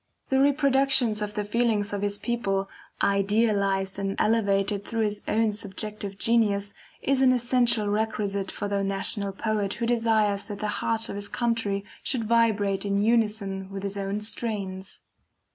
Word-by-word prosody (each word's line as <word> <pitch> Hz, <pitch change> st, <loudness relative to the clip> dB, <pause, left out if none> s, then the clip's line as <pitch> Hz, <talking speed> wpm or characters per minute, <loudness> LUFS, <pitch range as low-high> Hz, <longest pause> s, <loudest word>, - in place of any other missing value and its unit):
The 265 Hz, -, +3 dB
reproduction 275 Hz, -3 st, +3 dB
of 210 Hz, 0 st, -3 dB
the 210 Hz, -, -1 dB
feelings 210 Hz, -1 st, 0 dB
of 200 Hz, -, -2 dB
his 205 Hz, 0 st, 0 dB
people, 195 Hz, -5 st, -1 dB, 0.4 s
idealized 200 Hz, -1 st, +1 dB
and 195 Hz, 0 st, -2 dB
elevated 200 Hz, -2 st, +1 dB
through 225 Hz, +1 st, -1 dB
his 205 Hz, -1 st, -1 dB
own 220 Hz, -1 st, +2 dB
subjective 205 Hz, 0 st, -4 dB
genius, 205 Hz, -3 st, +2 dB, 0.3 s
is 270 Hz, -1 st, +2 dB
an 260 Hz, -1 st, +6 dB
essential 240 Hz, -3 st, +2 dB
requisite 205 Hz, -2 st, -1 dB
for 205 Hz, -, -4 dB
the 200 Hz, -1 st, -1 dB
national 195 Hz, +1 st, +1 dB
poet 205 Hz, 0 st, -2 dB
who 235 Hz, +3 st, -2 dB
desires 220 Hz, -4 st, +1 dB
that 205 Hz, -2 st, -6 dB
the 210 Hz, +1 st, -3 dB
heart 225 Hz, 0 st, 0 dB
of -, -, -6 dB
his 205 Hz, 0 st, -4 dB
country 225 Hz, -5 st, -1 dB, 0.2 s
should 250 Hz, -4 st, -1 dB
vibrate 210 Hz, -4 st, +2 dB
in 200 Hz, -1 st, 0 dB
unison 210 Hz, -4 st, 0 dB
with 195 Hz, 0 st, -6 dB
his 200 Hz, 0 st, -2 dB
own 200 Hz, +1 st, -3 dB
strains. 200 Hz, -4 st, -5 dB
210 Hz, 155 wpm, -26 LUFS, 200-230 Hz, 0.4 s, an